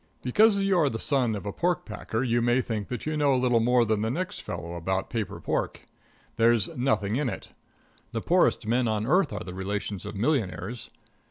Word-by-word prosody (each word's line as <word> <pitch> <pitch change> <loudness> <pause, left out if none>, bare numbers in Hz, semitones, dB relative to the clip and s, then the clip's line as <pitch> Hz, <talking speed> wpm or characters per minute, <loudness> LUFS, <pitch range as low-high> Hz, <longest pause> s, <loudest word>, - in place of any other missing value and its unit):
Because 205 - +4
you 195 -1 +2
are 150 -4 +3
the 110 - -3
son 125 -3 +1
of 100 - -6
a 100 - -3
pork 175 +5 0
packer 110 +2 -3
you 120 -2 +1
may 120 +2 +3
think 110 -5 -3
that 125 -3 -5
you 155 0 -1
know 145 -3 +3
a - - +2
little 125 -2 +3
more 120 +1 +3
than 110 -1 0
the 110 - 0
next 185 +9 -3
fellow 85 +1 -6
about 95 +3 -2
paper 110 -4 -3
pork. - - -2 0.5
There's 115 -3 +3
nothing 110 -4 0
in 145 -3 0
it. 95 - -7 0.6
The - - -3
poorest - - +2
men 120 +2 +1
on 110 -1 0
earth 155 +2 +3
are - - -4
the 90 - -7
relations 100 +1 -4
of - - -6
millionaires. 115 - -1
120 Hz, 205 wpm, -27 LUFS, 105-135 Hz, 0.6 s, Because